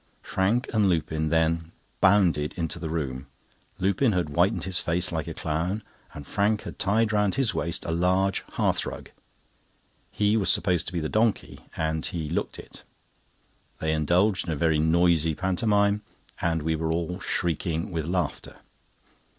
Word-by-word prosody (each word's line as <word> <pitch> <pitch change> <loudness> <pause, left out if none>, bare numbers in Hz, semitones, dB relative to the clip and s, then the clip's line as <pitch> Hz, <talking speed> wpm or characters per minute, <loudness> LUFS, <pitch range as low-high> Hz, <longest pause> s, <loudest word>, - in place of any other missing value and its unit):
Frank 110 +8 0
and 105 -3 +3
Lupin 80 -2 0
then 80 0 +1 0.3
bounded 90 -7 +3
into 85 -1 -3
the 80 -1 -4
room. 70 -5 -3 0.5
Lupin 100 +5 +2
had 90 -4 0
whitened 90 +5 +1
his 95 -1 0
face 90 +2 0
like 80 -3 -3
a - - -4
clown, 85 +7 -2 0.3
and 75 - -8
Frank 105 +4 0
had - - -8
tied 110 +3 +2
round 105 -2 +2
his 135 -4 +2
waist 85 +2 -1
a - - -2
large 95 +3 +1
hearthrug. - - -1 1.0
He 105 +1 +1
was 100 - +1
supposed 90 -4 +2
to - - -5
be 85 - -1
the 80 - -1
donkey, 110 +4 0 0.2
and 80 0 -1
he 80 -3 -4
looked 85 - -2
it. - - -12 1.0
They 80 - -1
indulged 90 +5 +2
in - - -1
a - - -1
very 80 +1 +2
noisy 80 0 +3
pantomime, 100 +3 +1 0.4
and 80 -2 0
we 80 +1 0
were 80 0 -1
all 85 +2 -2
shrieking 85 0 -2
with 80 -3 -2
laughter. 90 0 -2
85 Hz, 160 wpm, -26 LUFS, 80-100 Hz, 1.0 s, and